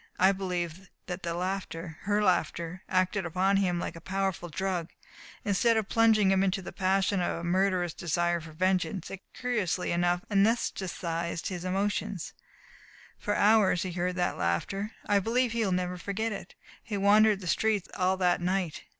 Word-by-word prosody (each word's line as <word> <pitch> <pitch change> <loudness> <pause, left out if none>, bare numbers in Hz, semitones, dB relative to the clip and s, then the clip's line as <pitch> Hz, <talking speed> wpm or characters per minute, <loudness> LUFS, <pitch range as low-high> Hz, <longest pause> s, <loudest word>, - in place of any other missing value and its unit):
I 190 +1 +5
believe 180 -1 -4 0.2
that 180 -1 -5
the 170 -1 -3
laughter 175 -3 -4
her 205 +1 +2
laughter 175 -1 0
acted 185 +1 +1
upon 185 +3 +1
him 180 -3 +1
like - - -4
a 165 - -10
powerful 190 -1 -2
drug. 180 0 -2 0.6
Instead 220 +3 +3
of 220 -2 -1
plunging 220 -4 +4
him 190 0 +3
into 195 0 0
the - - -8
passion 195 0 +1
of 175 - -1
a 170 - -6
murderous 180 -1 +1
desire 175 0 0
for 160 0 -10
vengeance 185 +2 0
it 195 - -7
curiously 215 -8 -1
enough 175 +1 +1
anesthetized 185 -5 0
his 180 -2 -5
emotions. 195 0 -2 0.9
For 205 - -1
hours 205 -4 +4
he 185 - -3
heard 180 +1 -1
that 180 -1 -1
laughter. 195 - -1
I 205 -1 +3
believe 235 +4 +1
he 230 0 0
will 195 - 0
never 180 0 -1
forget 220 +4 -2
it. 195 -3 -7 0.3
He 210 -3 -4
wandered 205 +1 +5
the 190 - -9
streets 210 +2 +1
all 185 0 +1
that 180 -1 +2
night. 180 -2 -1
185 Hz, 165 wpm, -29 LUFS, 175-200 Hz, 0.9 s, I